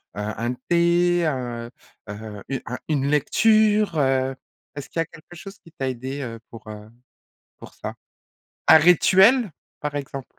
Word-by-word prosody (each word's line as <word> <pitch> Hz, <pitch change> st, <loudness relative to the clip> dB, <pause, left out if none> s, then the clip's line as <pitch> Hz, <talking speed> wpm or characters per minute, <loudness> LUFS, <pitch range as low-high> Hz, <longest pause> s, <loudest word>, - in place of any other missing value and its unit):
un 110 Hz, +4 st, -3 dB, 0.2 s
thé, 175 Hz, 0 st, +3 dB
heu 120 Hz, -4 st, -3 dB, 0.4 s
heu, 105 Hz, -1 st, -8 dB
u 135 Hz, -2 st, -2 dB
un 125 Hz, -, -4 dB
une 140 Hz, -3 st, 0 dB
lecture, 210 Hz, +5 st, +3 dB
heu? 135 Hz, -1 st, +1 dB, 0.4 s
Est-ce 145 Hz, -, -7 dB
qu'il 165 Hz, -, -4 dB
y -, -, +3 dB
a -, -, -12 dB
quelque 165 Hz, +2 st, -16 dB
chose 195 Hz, +3 st, -11 dB
qui 165 Hz, -, -19 dB
t'a 135 Hz, -3 st, -3 dB
aidé, 130 Hz, +3 st, -5 dB
heu, 115 Hz, -3 st, -6 dB
pour, 115 Hz, -1 st, -12 dB
heu, 105 Hz, 0 st, -10 dB, 0.7 s
pour -, -, -13 dB
ça? -, -, -7 dB, 0.8 s
Un 160 Hz, -, +10 dB
rituel, 190 Hz, -, +5 dB, 0.3 s
par 145 Hz, -1 st, -4 dB
exemple? 135 Hz, -2 st, -5 dB
145 Hz, 155 wpm, -23 LUFS, 120-170 Hz, 0.8 s, Un